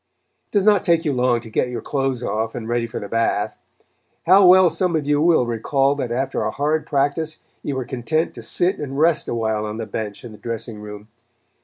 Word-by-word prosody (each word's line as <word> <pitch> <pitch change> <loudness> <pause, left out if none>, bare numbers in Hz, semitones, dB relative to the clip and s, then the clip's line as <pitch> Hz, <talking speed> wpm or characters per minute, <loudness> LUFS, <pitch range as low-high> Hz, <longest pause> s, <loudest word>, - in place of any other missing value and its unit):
It - - -49
does 205 -2 +2
not 210 -2 +4
take 170 0 +2
you 150 - +1
long 125 -2 +1
to 115 - -11
get 125 - 0
your 120 -2 -4
clothes 135 -3 -2
off 110 0 -2
and 115 -2 -5
ready 120 0 -1
for 115 - -5
the 100 - -6
bath. 115 +2 -1 0.7
How 190 +2 +7
well 185 0 +7
some 180 -3 0
of 155 -3 -1
you 145 0 +2
will 165 -6 +4
recall 135 +4 +1
that 130 -4 -4
after 130 +3 -1
a 110 - 0
hard 150 +6 -1
practice 145 +2 -1 0.2
you 140 - -3
were 130 -1 -3
content 155 +7 -1
to - - -9
sit 185 +3 +1
and 140 -2 -5
rest 160 +2 +3
awhile 110 -2 -1
on 105 0 -5
the 115 - -4
bench 105 +1 -6
in 120 - -8
the 105 - -13
dressing 115 -2 -5
room. 105 0 -9
130 Hz, 220 wpm, -21 LUFS, 115-155 Hz, 0.7 s, How